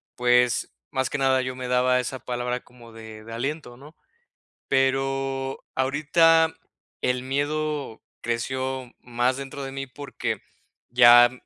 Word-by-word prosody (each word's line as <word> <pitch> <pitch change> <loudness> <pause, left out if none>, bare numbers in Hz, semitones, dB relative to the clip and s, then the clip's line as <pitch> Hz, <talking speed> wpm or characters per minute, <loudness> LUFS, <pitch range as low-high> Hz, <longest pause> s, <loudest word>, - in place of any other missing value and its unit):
pues, 125 -1 +3 0.2
más 130 0 0
que 145 - -3
nada, 130 -1 +3
yo 130 0 -4
me 130 -1 -5
daba 125 0 +3
esa 125 +1 -4
palabra 125 0 -3
como 120 -2 -16
de 110 -1 -11
de 115 +1 -9
aliento, 130 0 -4
¿no? 150 +4 -14 0.7
Pero 135 0 0
ahorita, 160 +4 +3 0.5
el 125 0 +1
miedo 145 -1 -2 0.2
creció 130 +2 -2
más 125 +1 0
dentro 140 0 -7
de 135 0 -5
mí 135 0 -5
porque, 140 +3 -5 0.5
ya, 120 0 +8
130 Hz, 130 wpm, -25 LUFS, 125-135 Hz, 0.7 s, ya